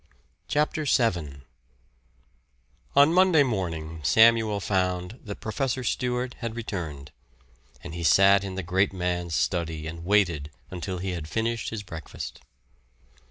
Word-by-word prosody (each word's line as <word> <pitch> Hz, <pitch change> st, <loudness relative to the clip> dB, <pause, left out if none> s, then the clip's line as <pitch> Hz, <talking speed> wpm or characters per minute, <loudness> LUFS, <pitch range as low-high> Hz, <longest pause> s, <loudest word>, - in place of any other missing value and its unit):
CHAPTER 150 Hz, +1 st, 0 dB
VII 85 Hz, -, 0 dB, 1.5 s
On 145 Hz, +3 st, +6 dB
Monday 180 Hz, -4 st, +5 dB
morning 85 Hz, -, -3 dB
Samuel 110 Hz, +4 st, +4 dB
found 90 Hz, +2 st, -1 dB
that 100 Hz, -2 st, -7 dB
Professor 130 Hz, +3 st, -2 dB
Stewart 125 Hz, 0 st, -1 dB
had 115 Hz, -2 st, -4 dB
returned, 80 Hz, -11 st, -5 dB, 0.7 s
and 90 Hz, -, -7 dB
he 85 Hz, 0 st, -5 dB
sat 100 Hz, +3 st, +5 dB
in 95 Hz, -1 st, -5 dB
the 95 Hz, -, -3 dB
great 95 Hz, +3 st, +1 dB
man's 90 Hz, -2 st, -2 dB
study 80 Hz, -3 st, -1 dB
and 85 Hz, +1 st, -7 dB
waited 85 Hz, -7 st, +2 dB, 0.2 s
until 90 Hz, +1 st, -4 dB
he 95 Hz, +1 st, -3 dB
had 85 Hz, -4 st, -5 dB
finished 115 Hz, +5 st, -2 dB
his 110 Hz, -2 st, -5 dB
breakfast. 80 Hz, -4 st, -8 dB
95 Hz, 125 wpm, -26 LUFS, 85-115 Hz, 1.5 s, On